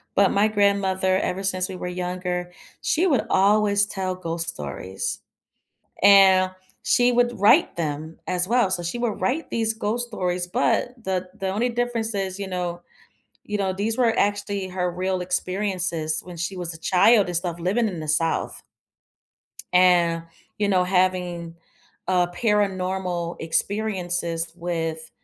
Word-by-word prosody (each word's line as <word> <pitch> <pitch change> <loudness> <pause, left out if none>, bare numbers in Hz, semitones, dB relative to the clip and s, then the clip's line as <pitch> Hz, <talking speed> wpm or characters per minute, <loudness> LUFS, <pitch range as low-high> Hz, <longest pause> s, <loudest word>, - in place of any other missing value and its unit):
But 200 -1 +4
my 210 +2 +3
grandmother, 195 -2 +2
ever 195 +1 -2
since 185 0 -1
we 185 - -6
were 180 - -5
younger, 180 0 -3 0.3
she 350 +4 +2
would 275 -9 +2
always 205 +1 +3
tell 190 -2 -3
ghost 165 -2 -3
stories, 85 +7 -5 0.8
and 190 -2 +7 0.3
she 245 0 +3
would 240 -1 +1
write 220 - +4
them 155 0 -4
as 180 +1 0
well. 235 -5 +3
So, 180 -2 0
she 170 +7 -3
would 235 -3 -2
write 295 +6 -1
these 225 -1 0
ghost 225 +3 -2
stories, 180 -4 -2
but 245 +4 0
the 185 -1 -2
the 190 0 -2
only 225 +6 0
difference 235 -2 -2
is, 190 -1 -3
you 195 - -4
know 175 -1 -3 0.6
you 210 - -3
know, 190 -1 0
these 210 +4 -1
were 230 -3 +3
actually 200 -1 0
her 180 -1 -2
real 185 +1 -1
experiences 180 -3 -1
when 180 -1 -10
she 180 +3 -4
was 175 -2 -4
a - - -11
child 195 +5 +4
and 180 - -4
stuff 175 -1 -2
living 210 +7 +1
in 180 -5 -5
the 155 - -5
South 160 +2 0 1.1
and, 175 -2 +4 0.4
you 205 - +1
know, 185 -2 +3
having, 180 -2 0 0.5
uh, 180 -1 +2
paranormal 185 -4 -1
experiences 175 -2 -2
with, 165 -2 -3
185 Hz, 150 wpm, -24 LUFS, 175-205 Hz, 1.1 s, and